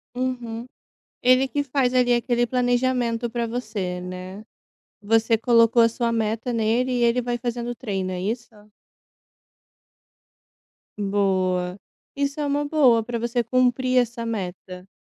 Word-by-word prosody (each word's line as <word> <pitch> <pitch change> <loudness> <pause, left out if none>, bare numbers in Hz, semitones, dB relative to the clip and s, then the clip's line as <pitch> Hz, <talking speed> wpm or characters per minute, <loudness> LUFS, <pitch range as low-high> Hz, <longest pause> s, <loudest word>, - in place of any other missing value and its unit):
Uhum. 245 -2 -3 0.6
Ele 255 +2 +5
que 285 +2 -1
faz 265 -2 0
ali, 250 -1 +3
aquele 240 0 +1
planejamento, 245 -1 0
pra 235 0 -2
você, 215 -6 -4
né, 185 +3 -8 0.6
você 225 +2 +2
colocou 230 +1 +4
a 230 - +5
sua 235 0 -1
meta 225 +2 -1
nele, 230 +3 +1
e 245 -1 0
ele 235 +1 +3
vai 240 0 -2
fazendo 240 0 -4
treino, 195 -6 -3
é 180 -1 -4
isso? 230 +5 -3 2.5
Boa. 190 -2 0 0.4
Isso 280 +1 -2
é 295 - 0
uma 285 +1 0
boa, 265 -7 +4
pra 235 +1 -4
você 235 +1 -1
cumprir 255 +1 +1
essa 240 -1 0
meta. 185 -3 -6
235 Hz, 130 wpm, -23 LUFS, 215-250 Hz, 2.5 s, Ele